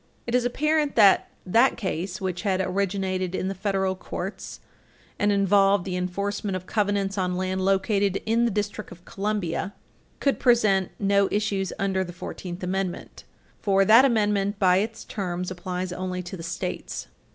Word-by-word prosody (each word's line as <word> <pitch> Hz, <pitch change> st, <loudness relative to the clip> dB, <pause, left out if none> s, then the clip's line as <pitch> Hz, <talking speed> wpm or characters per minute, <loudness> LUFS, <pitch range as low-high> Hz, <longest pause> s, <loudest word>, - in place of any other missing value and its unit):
It 235 Hz, -, -4 dB
is 250 Hz, -1 st, +3 dB
apparent 300 Hz, +3 st, +1 dB
that 205 Hz, -4 st, +5 dB, 0.2 s
that 230 Hz, +8 st, +4 dB
case, 185 Hz, -3 st, -3 dB
which 185 Hz, -2 st, -3 dB
had 195 Hz, -3 st, 0 dB
originated 190 Hz, -1 st, -1 dB
in 190 Hz, -, -1 dB
the -, -, -2 dB
federal 190 Hz, -1 st, -1 dB
courts 185 Hz, +1 st, -6 dB, 0.6 s
and 205 Hz, 0 st, +3 dB
involved 200 Hz, -1 st, +3 dB
the 185 Hz, -2 st, -3 dB
enforcement 195 Hz, +2 st, -2 dB
of 185 Hz, 0 st, -5 dB
covenants 200 Hz, -1 st, 0 dB
on 180 Hz, -1 st, 0 dB
land 185 Hz, 0 st, -1 dB
located 195 Hz, 0 st, +1 dB
in 230 Hz, +2 st, +2 dB
the -, -, +2 dB
District 210 Hz, 0 st, -3 dB
of 175 Hz, 0 st, -13 dB
Columbia, 200 Hz, -2 st, -2 dB, 0.4 s
could 275 Hz, -, +1 dB
present 215 Hz, -7 st, +3 dB
no 200 Hz, -1 st, +3 dB
issues 200 Hz, -2 st, -1 dB
under 190 Hz, -1 st, 0 dB
the 175 Hz, -1 st, -8 dB
Fourteenth 180 Hz, 0 st, -7 dB
Amendment, 185 Hz, 0 st, -4 dB, 0.3 s
for 195 Hz, -1 st, +3 dB
that 225 Hz, +5 st, +8 dB
Amendment, 205 Hz, -5 st, +2 dB
by 185 Hz, -3 st, +4 dB
its 220 Hz, +3 st, -2 dB
terms, 180 Hz, -3 st, -4 dB
applies 180 Hz, 0 st, -4 dB
only 180 Hz, 0 st, -4 dB
to 180 Hz, +2 st, -7 dB
the 170 Hz, -, -8 dB
States. 170 Hz, +1 st, -4 dB
195 Hz, 160 wpm, -25 LUFS, 185-205 Hz, 0.6 s, that